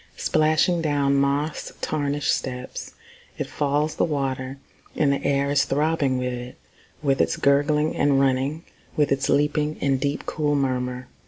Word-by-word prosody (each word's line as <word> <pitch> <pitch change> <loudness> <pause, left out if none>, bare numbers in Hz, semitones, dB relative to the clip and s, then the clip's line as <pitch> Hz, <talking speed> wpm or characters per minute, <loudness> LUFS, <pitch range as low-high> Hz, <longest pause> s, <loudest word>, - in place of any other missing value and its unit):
Splashing 155 +3 +2
down 145 -3 +1
moss 140 +3 0
tarnished 145 -2 0
steps 125 -1 -6 0.4
It - - -2
falls, 145 +2 -1
the - - +2
water; 135 -3 -2 0.4
And 140 -2 +2
the 140 - -3
air 140 0 +1
is 140 -1 +3
throbbing 145 -2 +1
with 125 0 -2
it. 125 0 -7 0.5
With 135 -2 +2
its - - +1
gurgling 150 +2 +2
and 140 -1 +3
running. 135 +4 +1 0.3
With 150 -1 +2
its 135 0 +1
leaping, 150 +1 +1
and 135 -2 +1
deep, 140 +1 -2
cool 150 -1 0
murmur. 125 -2 -1
140 Hz, 150 wpm, -24 LUFS, 135-150 Hz, 0.5 s, is